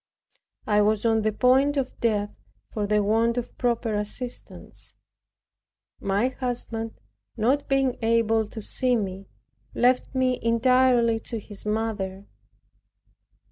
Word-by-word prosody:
I 210 -1 +3
was 210 +1 +1
on 225 -1 +3
the 215 0 +1
point 265 +6 +3
of 265 -2 -2
death 210 -3 0 0.4
for 210 -2 -1
the 210 0 +2
want 225 +3 +2
of 245 - -4
proper 235 -2 0
assistance. 210 +4 -5 1.0
My 200 +6 +1
husband, 240 -3 -4 0.4
not 270 +6 +1
being 270 -2 +2
able 225 -1 +2
to 220 0 -8
see 250 +2 +1
me, 195 -3 -4 0.5
left 250 +2 +2
me 255 -1 +1
entirely 235 0 +3
to 230 - -5
his 205 0 -7
mother. 210 -3 -2
230 Hz, 120 wpm, -25 LUFS, 210-250 Hz, 1.0 s, I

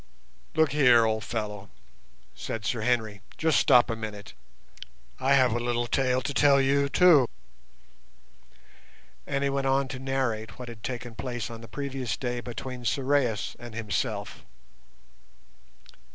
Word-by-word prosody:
"Look 160 -3 +3
here, 125 -5 +5
old 110 0 -1
fellow," 105 -3 -5 0.6
said 110 -2 -6
Sir 115 +2 -1
Henry, 110 -4 0 0.2
"just 160 -2 +3
stop 120 -1 +5
a 115 - -2
minute. 105 -2 -8 0.9
I 135 +1 +3
have 130 -3 +4
a 120 - 0
little 120 0 -1
tale 130 +1 +1
to 140 - -3
tell 140 0 +5
you 140 +1 +2
too." 155 -6 +6 2.0
And 140 0 -1
he 140 - +1
went 135 0 -1
on 135 0 +2
to 130 - -6
narrate 125 -5 -2
what 125 -1 -8
had 115 -2 -10
taken 120 +1 -5
place 120 0 -5
on 115 -1 -9
the 115 - -11
previous 135 -2 -4
day 125 -1 -3
between 125 +1 -7
Sorais 130 -2 0
and 120 -2 -9
himself. 105 -1 -3
125 Hz, 140 wpm, -27 LUFS, 115-135 Hz, 2.0 s, too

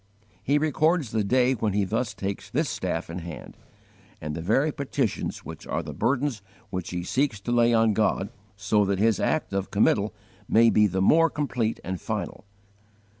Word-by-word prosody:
He 140 +5 +2
records 155 -2 +1
the 110 -1 0
day 125 +5 +3
when 110 -4 -1
he 100 0 +2
thus 105 +2 -2
takes 100 0 -5
this - - 0
staff 80 - -3
in 85 +2 -5
hand, 85 -2 -9 0.6
and 75 0 -5
the 80 - -4
very 135 - +2
petitions 140 -1 -3
which - - -9
are - - -2
the - - -7
burdens 130 -3 0 0.3
which 90 -1 -4
he 90 -1 -3
seeks 130 +2 0
to 120 - -4
lay 120 0 +4
on 115 -1 +3
God, 100 -1 +1 0.3
so 105 +1 +2
that 100 -1 0
his 110 +2 +2
act 155 -10 0
of 100 -1 -2
committal 105 0 +2 0.4
may 115 0 +5
be 105 -1 +4
the 95 -1 -1
more 165 +10 +5
complete 125 -7 -2
and 95 -1 -4
final. - - -4
110 Hz, 180 wpm, -26 LUFS, 95-130 Hz, 0.6 s, may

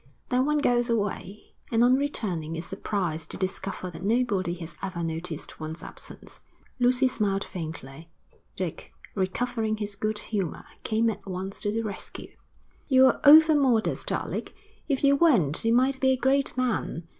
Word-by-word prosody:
Then 255 +2 +2
one 300 0 +2
goes 245 -4 +2
away, 205 -2 -3 0.2
and 230 0 +4
on 245 +1 +5
returning 185 - -2
is 165 - -5
surprised 185 -5 -3
to - - -7
discover 185 -1 -4
that 165 - -10
nobody 200 -4 +1
has 170 -1 -8
ever 185 -3 -4
noticed 165 -1 -5
one's 155 +1 -6
absence.' - - -9 0.4
Lucy 250 +1 +4
smiled 205 -6 0
faintly. 160 -3 -7 0.5
Dick, - - -5 0.2
recovering 215 +3 -1
his 205 -1 -4
good 215 +1 -2
humour, 200 -5 -3 0.2
came 225 +1 +1
at 200 -1 -10
once 190 +1 -5
to 205 - 0
the 225 +1 -1
rescue. 205 -3 -6 0.6
'You're 260 -2 +5
overmodest, 290 -6 +5
Alec. - - -3 0.3
If 280 -2 0
you 280 0 +6
weren't, 240 - +3
you 225 - +2
might 260 +3 +3
be 265 - +3
a 260 - +3
great 270 +1 +1
man. 235 -9 -1
215 Hz, 155 wpm, -27 LUFS, 185-255 Hz, 0.6 s, you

